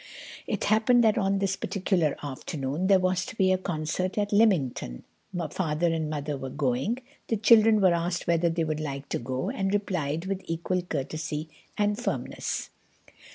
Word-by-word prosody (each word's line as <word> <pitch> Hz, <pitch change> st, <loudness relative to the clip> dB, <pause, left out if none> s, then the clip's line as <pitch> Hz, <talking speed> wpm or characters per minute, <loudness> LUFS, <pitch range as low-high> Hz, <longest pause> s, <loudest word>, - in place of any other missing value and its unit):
It -, -, -2 dB
happened 235 Hz, +3 st, +4 dB
that 220 Hz, +1 st, +4 dB
on 195 Hz, -1 st, +1 dB
this 195 Hz, -1 st, 0 dB
particular 185 Hz, -7 st, 0 dB
afternoon 145 Hz, +4 st, -3 dB
there 195 Hz, -1 st, +6 dB
was 185 Hz, 0 st, +1 dB
to 255 Hz, -, -8 dB
be 190 Hz, -3 st, +3 dB
a 185 Hz, -, +3 dB
concert 175 Hz, +3 st, -2 dB
at 205 Hz, 0 st, 0 dB
Lymington—Father 165 Hz, -, 0 dB
and 160 Hz, -2 st, -1 dB
Mother 150 Hz, -1 st, -3 dB
were 135 Hz, 0 st, -5 dB
going. 135 Hz, -, 0 dB, 0.3 s
The 225 Hz, -, 0 dB
children 220 Hz, 0 st, +6 dB
were 185 Hz, -3 st, +5 dB
asked 170 Hz, +1 st, -1 dB
whether 170 Hz, 0 st, +2 dB
they 165 Hz, 0 st, 0 dB
would 155 Hz, -1 st, -2 dB
like 140 Hz, -2 st, -5 dB
to -, -, -1 dB
go, 130 Hz, +2 st, -3 dB
and 195 Hz, 0 st, -1 dB
replied 175 Hz, -6 st, -1 dB
with 195 Hz, 0 st, -2 dB
equal 170 Hz, +2 st, -1 dB
courtesy 155 Hz, -1 st, -4 dB, 0.3 s
and 210 Hz, +1 st, +1 dB
firmness. 245 Hz, -, -3 dB
175 Hz, 160 wpm, -27 LUFS, 150-200 Hz, 0.3 s, there